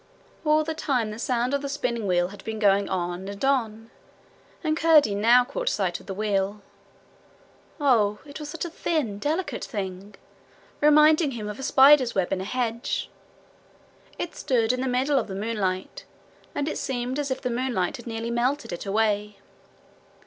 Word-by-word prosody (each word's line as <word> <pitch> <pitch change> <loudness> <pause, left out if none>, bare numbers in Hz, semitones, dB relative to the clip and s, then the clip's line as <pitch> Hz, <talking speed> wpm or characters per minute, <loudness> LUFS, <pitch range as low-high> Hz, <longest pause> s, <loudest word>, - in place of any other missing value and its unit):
All 305 0 +3
the 320 +1 -3
time 250 -8 -1
the 215 - -8
sound 245 +1 0
of 280 - +1
the 280 - -4
spinning 235 -7 -2 0.2
had 205 - -12
been 220 0 -4
going 200 -1 +3
on 180 0 -3
and 200 +5 -4
on, 225 -5 0 0.7
and 310 -1 +1
Curdie 315 -9 +5
now 235 +5 +5
caught 280 - -2
sight 185 -5 -1
of - - -17
the 195 - -5
wheel. 200 0 -1 1.2
Oh, 225 -8 +3
it 285 +1 -9
was 300 -1 -7
such 330 +2 -4
a 340 - -6
thin, 285 -12 -2
delicate 315 - -2
thing 195 -1 -6 0.7
reminding 300 0 +5
him 215 -3 -5
of 210 +2 -6
a - - -5
spider's 265 -2 +5
web 190 -1 0
in 185 - -2
a - - -5
hedge. 235 +1 -2 1.1
It 345 - -5
stood 235 -2 +1
in 255 - -2
the 265 - -1
middle 265 +3 +2
of - - -4
the 190 - -6
moonlight, 195 -3 -3 0.5
and 290 0 -1
it 310 - -2
seemed 255 +1 -3
as 285 -1 -2
if 260 - -2
the 250 - -3
moonlight 240 -4 -1
had 240 - -12
nearly 230 0 -4
melted 245 -2 -1
it 175 - -6
away. 210 0 0
235 Hz, 175 wpm, -25 LUFS, 205-280 Hz, 1.2 s, Curdie